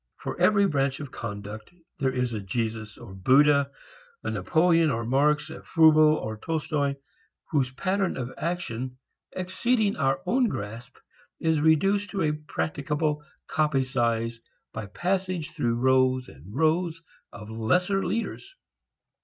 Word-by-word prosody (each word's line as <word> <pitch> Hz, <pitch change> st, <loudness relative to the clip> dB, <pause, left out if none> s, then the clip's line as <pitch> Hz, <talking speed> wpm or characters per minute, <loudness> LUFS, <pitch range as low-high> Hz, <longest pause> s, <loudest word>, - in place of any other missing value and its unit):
For -, -, -5 dB
every 200 Hz, -1 st, +5 dB
branch 135 Hz, -6 st, 0 dB
of 145 Hz, -3 st, -7 dB
conduct, 105 Hz, -1 st, -7 dB, 0.3 s
there 135 Hz, -, +2 dB
is 125 Hz, -2 st, -1 dB
a 110 Hz, -, -2 dB
Jesus 110 Hz, +2 st, -3 dB
or 115 Hz, -5 st, -11 dB
Buddha, 140 Hz, +8 st, +4 dB, 0.5 s
a -, -, -2 dB
Napoleon 165 Hz, -1 st, +3 dB
or 115 Hz, -3 st, -1 dB
Marx, 150 Hz, +4 st, +2 dB
a -, -, -8 dB
Froebel 160 Hz, -1 st, +5 dB
or 110 Hz, -6 st, -4 dB
Tolstoi, 150 Hz, -1 st, -1 dB, 0.6 s
whose 140 Hz, -5 st, +2 dB
pattern 190 Hz, +7 st, -1 dB
of 125 Hz, 0 st, -4 dB
action, 130 Hz, -7 st, -3 dB, 0.4 s
exceeding 205 Hz, +4 st, 0 dB
our 135 Hz, -2 st, +1 dB
own 250 Hz, 0 st, +3 dB
grasp, 115 Hz, -, -6 dB, 0.4 s
is 160 Hz, -2 st, +1 dB
reduced 195 Hz, +7 st, +3 dB
to 195 Hz, -4 st, -1 dB
a 150 Hz, -, +2 dB
practicable 150 Hz, 0 st, -2 dB, 0.2 s
copy 150 Hz, -4 st, +1 dB
size 115 Hz, -3 st, -1 dB, 0.3 s
by 110 Hz, -2 st, -5 dB
passage 185 Hz, -, -2 dB
through 120 Hz, -1 st, 0 dB
rows 130 Hz, +1 st, +3 dB
and 75 Hz, +9 st, -14 dB
rows 165 Hz, +1 st, +1 dB, 0.3 s
of 105 Hz, +1 st, -10 dB
lesser 180 Hz, -, +1 dB
leaders. 385 Hz, +11 st, -3 dB
145 Hz, 135 wpm, -26 LUFS, 120-165 Hz, 0.6 s, every